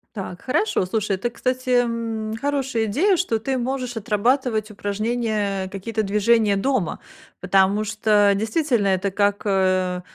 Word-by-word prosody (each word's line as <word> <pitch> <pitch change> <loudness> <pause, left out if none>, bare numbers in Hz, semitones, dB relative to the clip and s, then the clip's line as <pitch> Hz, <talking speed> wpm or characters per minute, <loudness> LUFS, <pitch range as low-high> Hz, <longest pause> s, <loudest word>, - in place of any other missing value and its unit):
Так, 185 -3 -6
хорошо, 255 - 0
слушай, 210 0 -1
это, 240 +6 -2
кстати, 255 +1 -3
м, 225 -2 -3
хорошая 270 -5 -1
идея, 335 - +2
что 335 -10 0
ты 260 +4 -2
можешь 250 0 -3
отрабатывать 225 +1 0
упражнения, 210 -1 -2
э, - - -8
какие-то 205 +3 -3
движения 210 +1 +2
дома. 210 - -1 0.4
Потому 195 +3 +3
что 210 -1 +3
действительно 225 +1 0
это 190 0 0
как, 205 0 +1
э, 185 -2 +1
215 Hz, 135 wpm, -22 LUFS, 200-245 Hz, 0.4 s, Потому